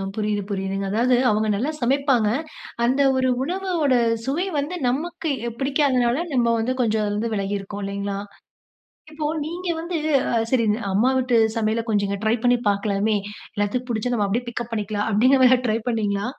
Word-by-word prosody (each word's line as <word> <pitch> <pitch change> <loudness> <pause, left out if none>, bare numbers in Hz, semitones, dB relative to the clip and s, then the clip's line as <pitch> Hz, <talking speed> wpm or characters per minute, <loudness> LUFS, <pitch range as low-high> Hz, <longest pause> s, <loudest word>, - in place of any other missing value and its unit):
புரியுது 210 -1 -1
புரியுதுங்க. 195 0 -2
அதாவது, 245 +3 +3
அவுங்க 215 +1 +1
நல்லா 265 +9 -1
சமைப்பாங்க. 260 -3 +2 0.6
அந்த 260 +4 +2 0.2
ஒரு 260 0 +2
உணவவோட 345 -4 0 0.3
சுவை 330 +8 0
வந்து 295 +6 -2
நமக்கு 325 +4 -2 0.2
எ - - -3
பிடிக்காதனால, 270 -3 +2 0.2
நம்ம 240 -2 +3
வந்து 250 +3 0
கொஞ்சம் 220 -2 +1
அதுல 205 - -1
இருந்து 225 +1 -2
வெலகியிருக்கோம் 200 0 -3
இல்லைங்ளா? 200 0 -3 0.9
இப்போ 305 -1 -4 0.2
நீங்க 350 +3 -5
வந்து 340 +1 -3 0.3
அ 235 - +1
சரி 245 -3 +3 0.3
"அம்மா 230 +7 +3
வீட்டு 250 -2 +2 0.2
சமையல 225 +1 0
கொஞ்சம் 200 -1 +1
ட்ரை 220 - +3
பண்ணி 245 0 +5
பாக்கலாமே, 200 +1 +1 0.4
எல்லாத்துக்கும் 245 +5 -2
பிடிச்சா 235 +2 -1
நம்ம 205 -3 +1
அப்டியே 235 +5 -2
பிக்கப் 240 0 -5
பண்ணிக்கலாம்". 210 -1 -2
அப்டிங்கிற 255 +6 +4
மாரி 255 - +7
ஏதா 250 - +4
ட்ரை 220 +1 +1
பண்ணீங்ளா? 205 -3 -1
235 Hz, 160 wpm, -23 LUFS, 205-265 Hz, 0.9 s, மாரி